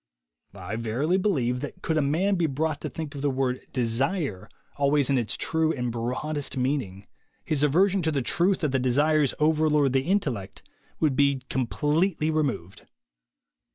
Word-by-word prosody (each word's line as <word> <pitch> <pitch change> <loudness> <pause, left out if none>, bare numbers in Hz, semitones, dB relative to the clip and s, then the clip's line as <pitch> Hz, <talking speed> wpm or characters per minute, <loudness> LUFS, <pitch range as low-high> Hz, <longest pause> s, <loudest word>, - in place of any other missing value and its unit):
I 100 +3 -5
verily 125 +10 0
believe 130 - 0
that - - -8
could 160 - 0
a 155 - +3
man 165 +8 +1
be 175 -4 +1
brought 155 +2 -2
to - - -4
think 155 -2 -6
of 140 - -6
the 145 - +1
word 130 -1 -1
"desire" 125 - -1 0.3
always 140 -1 +2
in 135 - +3
its 115 - -2
true 160 0 +1
and 125 -5 -2
broadest 130 +5 -3
meaning, 125 -8 -2 0.4
his 155 -3 0
aversion 185 +7 +3
to 160 -1 0
the 140 -4 -1
truth 180 +9 +1
that 150 -4 0
the 135 - +1
desires 145 +3 +2
over 155 0 +2
lord 145 -3 +2
the 135 - +3
intellect 135 - -2 0.4
would 150 -4 +2
be 140 -1 +2
completely 155 +6 0
removed. 135 - -2
145 Hz, 165 wpm, -26 LUFS, 125-155 Hz, 0.4 s, a